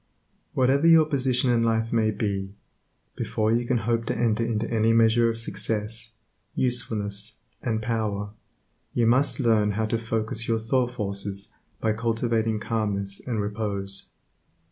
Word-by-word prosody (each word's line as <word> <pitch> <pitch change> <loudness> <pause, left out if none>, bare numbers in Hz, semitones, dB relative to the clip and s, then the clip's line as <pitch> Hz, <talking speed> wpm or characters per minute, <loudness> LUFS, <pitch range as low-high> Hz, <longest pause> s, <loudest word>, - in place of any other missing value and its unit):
Whatever 135 +4 +3
your 165 -1 +7
position 130 -4 +1
in 120 -1 +3
life 115 0 +1
may 110 -2 +3
be, 100 -2 -2 0.6
before 110 0 0
you 120 +1 +1
can 125 - +2
hope 115 +1 0
to - - -1
enter 115 -1 +1
into 115 -1 -1
any 115 0 +3
measure 115 +1 +4
of 115 - -3
success, 110 0 -2 0.4
usefulness, 110 -4 -1 0.2
and 110 -2 -1
power, 105 -3 -2 0.6
you 120 - +3
must 130 +6 +3
learn 110 -5 +3
how 110 +2 0
to 115 +1 -1
focus 115 0 -2
your 115 - +2
thought 125 +3 +1
forces 100 -3 -3 0.3
by 110 - +1
cultivating 115 -1 0
calmness 100 -3 -2
and 115 -4 -1
repose. 100 -2 -3
115 Hz, 145 wpm, -25 LUFS, 105-120 Hz, 0.6 s, your